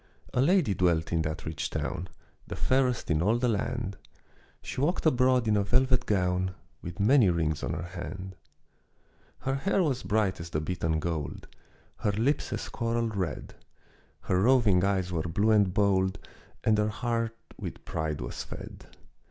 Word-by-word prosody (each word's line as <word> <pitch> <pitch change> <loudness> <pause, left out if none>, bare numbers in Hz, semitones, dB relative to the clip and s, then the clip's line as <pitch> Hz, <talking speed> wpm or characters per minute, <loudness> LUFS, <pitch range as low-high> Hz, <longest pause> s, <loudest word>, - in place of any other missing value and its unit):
A 125 - +2
lady 160 - +3
dwelt 85 -3 +1
in 80 - +2
that 75 -1 -4
rich 80 -1 -3
town, 90 +3 -3 0.4
The - - -5
fairest 130 -6 +1
in 75 0 +2
all 105 +6 +3
the 125 +1 +1
land; 115 -2 -2 0.7
She - - -4
walked 165 +5 0
abroad 125 -4 +3
in 105 - +3
a 105 - +3
velvet 125 +3 +2
gown, 95 -1 +1 0.3
With 90 0 -7
many 110 0 +5
rings 80 -3 0
on - - -2
her 85 - -3
hand. 90 +2 -7 1.1
Her 135 - -1
hair 190 +7 +1
was 135 -6 0
bright 105 -3 0
as 85 0 -6
the 75 - -1
beaten 80 0 -1
gold, 80 -3 -4 0.5
Her 105 - 0
lips 120 +8 0
as - - -3
coral 115 -1 -1
red, 95 - -3 0.7
Her 90 0 +1
roving 110 -6 +4
eyes 95 -2 +1
were 85 -2 0
blue 100 +7 +1
and 100 -3 +4
bold, 95 -1 +2 0.5
And 110 -1 +3
her 105 0 +2
heart 115 0 -2 0.2
with - - -7
pride 80 -1 -2
was - - -5
fed. - - -9
100 Hz, 165 wpm, -29 LUFS, 90-120 Hz, 1.1 s, many